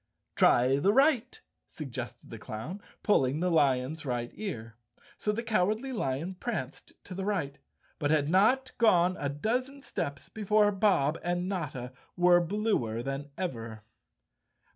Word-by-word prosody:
"Try 125 +3 +4
the 195 +7 +3
right," 265 -2 +3 0.3
suggested 125 -4 -7
the 115 - -7
clown, 130 - -6 0.2
pulling 140 - +2
the 180 +1 +1
lion's 140 -1 +2
right 120 -3 -3
ear. 115 - -6 0.4
So 210 - 0
the 230 +3 -3
Cowardly 220 +4 0
Lion 160 - -2
pranced 165 - -5
to 185 - -9
the 190 +1 -4
right, 180 -9 -2 0.4
but 145 - 0
had 150 -2 +2
not 235 - +3
gone 185 -5 +4
a 145 - -1
dozen 255 - -2
steps 140 0 -4
before 210 -1 +2
Bob 190 -7 +2
and 175 +1 -1
Notta 135 -10 -4 0.2
were 175 0 +6
bluer 170 - -1
than 135 +2 -4
ever. 115 - -5
175 Hz, 140 wpm, -29 LUFS, 135-210 Hz, 0.4 s, were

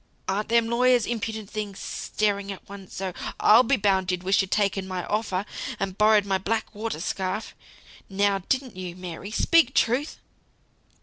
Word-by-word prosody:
Ar'n't 205 +3 -1
them 230 0 +3
lawyers 245 0 +3
impudent 220 -2 -3
things? 210 -3 -4
staring 200 -1 -2
at 195 - -10
one 200 -1 -10
so. 190 -1 -4 0.3
I'll 220 +3 +7
be 260 +2 +2
bound 190 -3 +2
you 180 - 0
wished 190 +3 +2
you'd 195 - -4
taken 195 -2 0
my 185 -1 -4
offer, 205 -3 -1 0.3
and 195 -1 -2
borrowed 210 0 +4
my 195 -1 0
black 220 +4 -2
watered 210 -6 -4
scarf! 190 +4 -3 0.6
Now 200 0 +2
didn't 260 -5 0
you, 180 -2 -6
Mary? 180 +1 -7
Speak 265 +4 +3
truth!" 255 +7 +1
205 Hz, 165 wpm, -25 LUFS, 190-225 Hz, 0.6 s, I'll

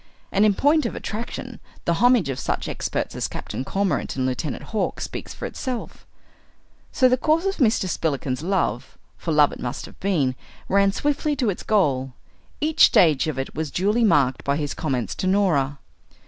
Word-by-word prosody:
And 200 +2 +4
in 205 -2 +3
point 300 +5 +3
of - - -6
attraction 235 +2 -6 0.3
the 170 - +2
homage 245 - +5
of 130 - -3
such - - -2
experts - - -3
as - - -1
Captain - - -5
Cormorant 195 +6 -1
and 130 -1 -1
Lieutenant 130 +3 -3
Hawk 215 - -1
speaks - - -6
for - - -6
itself. 255 -3 -5 0.8
So 255 - +4
the 255 0 +3
course 315 +6 +1
of 390 0 -1
Mr. 225 - +2
Spillikins's 140 -6 -2
love, 175 - -1 0.2
for 165 - -4
love 150 -2 +5
it - - -9
must 125 - -4
have - - -15
been, 160 -10 +1 0.3
ran 200 0 +3
swiftly 295 +6 0
to 250 -6 +1
its 180 - -7
goal. 135 -11 +1 0.5
Each 310 +1 +5
stage 155 -4 +4
of 155 - -3
it 135 - -4
was 155 0 -3
duly 210 +8 +1
marked 140 - +3
by 140 0 0
his 145 -2 -2
comments 125 - -2
to 185 - -3
Norah. 165 -8 +2
185 Hz, 180 wpm, -23 LUFS, 140-235 Hz, 0.8 s, homage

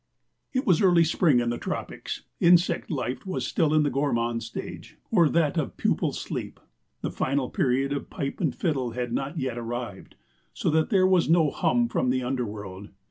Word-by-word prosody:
It 260 +2 -1
was 180 -8 +4
early 175 -4 +5
spring 160 -4 +3
in 120 0 0
the 120 - -3
tropics; - - -5 0.2
insect 175 +1 +4
life 130 -4 -3
was 135 -10 -3
still 150 +3 +1
in 155 -1 +4
the 145 - 0
gourmand 120 -4 0
stage, 115 - -8
or 175 -8 +5
that 165 0 +2
of 150 - -4
pupal - - +1
sleep. - - -5 0.4
The - - -2
final 135 -1 -1
period 135 +2 +1
of 140 - -4
pipe 140 0 -4
and 155 -8 0
fiddle 135 -9 -1
had 120 -1 -3
not 140 +6 -3
yet 130 -4 -2
arrived, 120 -4 -6 0.4
so - - 0
that 160 +1 +2
there 190 -4 +4
was 185 -3 +3
no 160 -3 +4
hum 240 -1 +1
from 130 - 0
the 130 0 +1
underworld. 105 -6 -4
140 Hz, 185 wpm, -26 LUFS, 120-165 Hz, 0.4 s, early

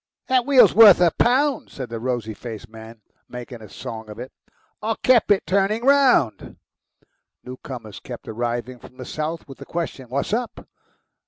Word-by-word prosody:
"That 255 -1 +2
wheel's 275 -3 +6
worth 215 -4 +8
a 175 -2 +4
pound," 270 - +1
said 130 -4 -8
the 115 -1 -5
rosy 120 -2 -3
faced 115 0 -9
man, 110 0 -13 0.3
making 125 -1 -9
a 105 - -12
song 110 +2 -8
of 105 - -10
it. 125 +2 -8 0.5
"I 220 +1 -1
kep' 250 -5 +4 0.2
turning 200 +4 0
it - - -4
round." 270 - +2 0.9
Newcomers 125 -4 -9
kept - - -10
arriving 120 +2 -4
from 130 - -16
the 130 - -8
south 155 +2 -5
with 135 - -12
the - - -9
question, 160 -7 -5
"What's 140 - -2
up?" 235 +1 -4
130 Hz, 165 wpm, -22 LUFS, -, 0.9 s, worth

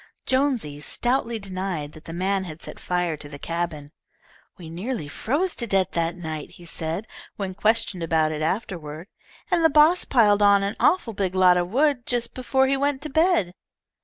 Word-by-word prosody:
Jonesy 260 - 0
stoutly 240 - -1
denied 185 -6 -4
that 155 - -15
the - - -7
man 190 +3 0
had 160 -2 -9
set - - -7
fire 180 -2 -1
to 145 0 -9
the 145 - -8
cabin. 165 -2 -4 0.7
"We 170 - -10
nearly 180 - -4
froze 295 - -1
to 235 - -1
death 195 -2 +1
that 170 0 -1
night," 160 -3 -5
he 175 - -14
said, 165 +4 -4 0.3
when 195 -2 -4
questioned 215 -2 +1
about 160 -1 +1
it 155 0 -4
afterward, 165 -1 -3 0.4
"and 345 -2 +3
the 320 - +6
boss 310 +4 +5
piled 210 -5 +4
on 200 -1 +5
an 200 +2 -2
awful 300 -11 +2
big 190 -2 -2
lot 185 -1 +6
of 175 0 0
wood 270 +1 +1
just 240 -1 -1
before 265 +1 +1
he 270 +1 +2
went 280 0 -1
to 305 - -6
bed." 320 - +2
195 Hz, 185 wpm, -24 LUFS, 165-250 Hz, 0.7 s, the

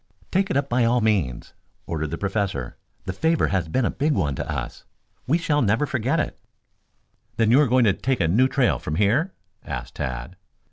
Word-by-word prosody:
"Take 195 +1 +1
it - - +1
up, 140 - 0
by 125 0 +2
all 120 +2 +3
means," 100 - 0 0.3
ordered 80 -2 -3
the 85 - -4
Professor. 100 - -2 0.3
"The 95 - -3
favor 160 - +1
has 90 -4 0
been 120 +10 0
a - - +1
big 150 +2 0
one 75 - 0
to - - -4
us. - - -5 0.4
We 155 +6 +3
shall 150 -3 +1
never 115 +6 +2
forget 135 +4 0
it." - - -3 1.0
"Then 115 -1 +3
you 135 +5 +6
are 145 - +3
going 125 +1 +4
to 100 - +4
take 130 +5 -1
a 85 - +2
new 115 +10 +4
trail 130 -2 +1
from 75 - -4
here?" 120 - +1 0.3
asked - - -6
Tad. 60 -1 -4
115 Hz, 200 wpm, -24 LUFS, 95-140 Hz, 1.0 s, you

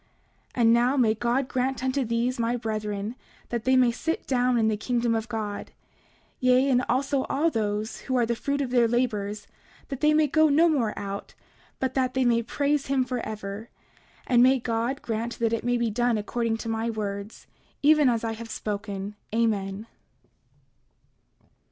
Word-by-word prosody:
29:17 245 - 0
And 230 0 +6
now 245 +4 +3
may 225 -4 +4
God 240 +4 0
grant 260 +1 -1
unto 260 +1 0
these, 235 +2 -1
my 235 +1 0
brethren, 215 -2 -3 0.4
that 235 -2 -3
they 260 0 +4
may 250 -2 +5
sit 320 +7 -3
down 250 -1 +2
in 220 -1 +3
the 220 - +1
kingdom 235 +2 0
of 225 0 -2
God; 215 -3 -4 0.7
yea, 255 +1 +4
and 250 0 +3
also 270 +2 +1
all 320 +4 +1
those 215 -1 -2
who 260 - -3
are 240 - +3
the 235 +1 -1
fruit 280 +4 -2
of 260 -3 -3
their 240 -2 +4
labors 215 -4 -1 0.4
that 270 -1 -5
they 305 0 +5
may 310 0 +4
go 315 +2 +3
no 315 +4 +5
more 255 -10 0
out, 200 0 -6 0.4
but 260 -1 -1
that 260 -1 0
they 260 -1 +2
may 235 -1 +3
praise 285 +4 -1
him 265 -1 +1
forever. 215 -3 -5 0.6
And 245 -2 +4
may 260 +2 +6
God 235 +4 -2
grant 230 +1 -3
that 230 -1 0
it 230 - -1
may 245 0 +1
be 235 -2 0
done 240 +1 +1
according 225 +2 -1
to 230 - -7
my 225 +1 -1
words, 205 -1 -5 0.4
even 300 -2 +5
as 235 -2 0
I 225 - -1
have 225 +1 -7
spoken. 205 -2 -4 0.2
Amen. 210 -3 0
235 Hz, 180 wpm, -26 LUFS, 220-260 Hz, 0.7 s, And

